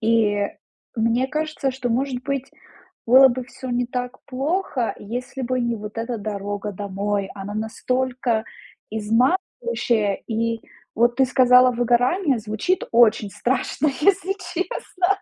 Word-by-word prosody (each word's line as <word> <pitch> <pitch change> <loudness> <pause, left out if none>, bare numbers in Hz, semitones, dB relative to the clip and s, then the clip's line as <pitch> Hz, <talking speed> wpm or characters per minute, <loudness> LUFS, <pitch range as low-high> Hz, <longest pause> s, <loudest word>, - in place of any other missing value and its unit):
И 215 -3 +2 0.5
мне 230 +3 +2
кажется, 305 -1 -2
что, 255 -1 -3
может 250 +1 -1
быть, 270 0 -3 0.6
было 265 +3 +8
бы 255 +1 -3
всё 255 +1 -8
не 245 0 0
так 250 0 -5
плохо, 275 -1 -1
если 250 +5 -5
бы 255 +1 0
не 235 -1 0
вот 210 +1 -7
эта 230 0 -3
дорога 205 0 -4
домой, 200 0 -2
она 200 +1 -6
настолько 245 +1 -1 0.5
изматывающая, 230 - 0
и 230 0 -1 0.3
вот 240 +2 +3
ты 265 - +5
сказала: 250 0 +5
"Выгорание". 245 - +2
Звучит 220 - -1
очень 220 -3 +4
страшно, 260 +5 0
если 390 +3 +3 0.2
честно. 365 0 -2
245 Hz, 125 wpm, -22 LUFS, 220-260 Hz, 0.6 s, было